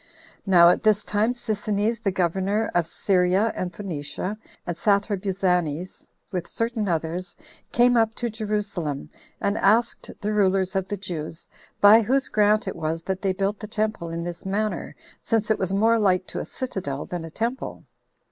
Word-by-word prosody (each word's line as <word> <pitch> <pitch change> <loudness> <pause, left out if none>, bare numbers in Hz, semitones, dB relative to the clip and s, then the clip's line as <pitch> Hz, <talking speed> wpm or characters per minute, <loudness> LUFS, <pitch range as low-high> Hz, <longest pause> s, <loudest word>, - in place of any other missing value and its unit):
Now 175 -3 +7
at 180 - +2
this 215 -1 +3
time 210 +3 +1
Sisinnes, 215 -1 -1
the 200 - +1
governor 190 +4 0
of 175 -2 +2
Syria 185 +4 +2
and 180 -1 -3
Phoenicia, 180 +1 -4 0.3
and 175 - -3
Sathrabuzanes, 190 -4 0 0.2
with 180 -3 -3
certain 230 -2 -2
others, 170 +1 -2 0.4
came 245 +1 +4
up 225 -1 +2
to 240 -2 -3
Jerusalem, 205 -9 -3 0.3
and 200 +1 0
asked 225 +4 +2
the 210 0 -1
rulers 190 -2 +2
of 190 -1 0
the 205 - -3
Jews, 170 -3 -5 0.3
by 210 +3 +8
whose 265 +5 +1
grant 210 0 +3
it - - -3
was 165 0 -3
that 190 +1 -3
they 195 - +1
built 195 +2 -1
the 210 - -7
temple 215 -5 -2
in 165 0 -4
this 175 0 -6
manner, 210 +2 -2 0.3
since 220 -1 0
it 220 - +1
was 190 -1 -1
more 225 +4 +3
like 185 -3 +2
to - - -4
a - - -4
citadel 185 - -4
than 175 -2 -5
a 165 - -7
temple? 235 +9 -3
195 Hz, 165 wpm, -24 LUFS, 180-215 Hz, 0.4 s, by